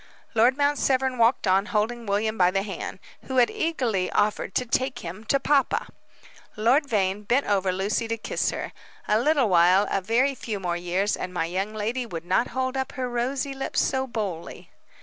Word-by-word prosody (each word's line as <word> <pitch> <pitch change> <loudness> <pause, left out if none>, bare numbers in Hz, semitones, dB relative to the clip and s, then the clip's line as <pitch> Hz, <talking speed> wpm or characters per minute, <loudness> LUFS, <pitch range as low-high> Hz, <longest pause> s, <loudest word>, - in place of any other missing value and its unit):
Lord 240 +3 +4
Mount 285 0 +2
Severn 260 -1 +1
walked 230 +1 +3
on, 195 +2 +3
holding 230 +1 -1
William 215 +2 0
by 180 -4 +4
the 195 +1 0
hand, 195 -3 -6 0.3
who 260 - -3
had 245 -2 +5
eagerly 240 - -1
offered 205 -2 0
to 250 - +1
"take 260 +2 -1
him" 180 +6 -7
to 275 - +2
papa. 275 0 +1 0.7
Lord 250 +8 +3
Vane 195 -2 0
bent 245 +7 +1
over 195 -2 +1
Lucy 200 +5 -1
to 230 0 -2
kiss - - -1
her. - - -5 0.3
A 210 - +3
little 280 -1 +3
while, 180 +2 +5
a 195 - +1
very 240 +8 +2
few 220 -5 -5
more 175 -2 -2
years, 180 +4 0
and 180 - -5
my 175 -2 -1
young 190 +5 -3
lady 230 +4 -2
would 165 -5 -6
not 185 +7 +2
hold 260 0 -2
up 265 0 -3
her 255 -2 -3
rosy 255 +3 -2
lips 270 0 -2
so 265 0 0
boldly. 200 -9 -5
225 Hz, 190 wpm, -25 LUFS, 195-260 Hz, 0.7 s, had